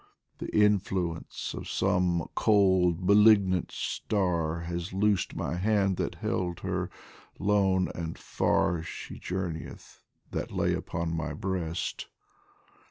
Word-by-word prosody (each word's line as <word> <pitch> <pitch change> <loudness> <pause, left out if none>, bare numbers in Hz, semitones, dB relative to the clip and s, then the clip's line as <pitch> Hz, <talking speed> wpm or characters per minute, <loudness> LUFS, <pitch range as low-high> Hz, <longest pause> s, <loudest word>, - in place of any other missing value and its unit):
The - - -4
influence 95 -5 0
of - - -7
some 90 -2 +1
cold 95 -4 +3
malignant 100 -3 +5
star 85 -5 -1
Has 85 +2 -4
loosed 100 -1 +1
my 85 - -2
hand 100 -1 +2
that - - -2
held 90 -2 -2
her, - - -2 0.5
lone 95 -2 +2
and 80 -1 -5
far 85 -2 +1
She 80 - -8
journeyeth 90 -3 -5 0.3
that - - -3
lay - - 0
upon 85 0 -3
my 80 -2 -3
breast. 85 0 -3
90 Hz, 110 wpm, -29 LUFS, 85-100 Hz, 0.5 s, malignant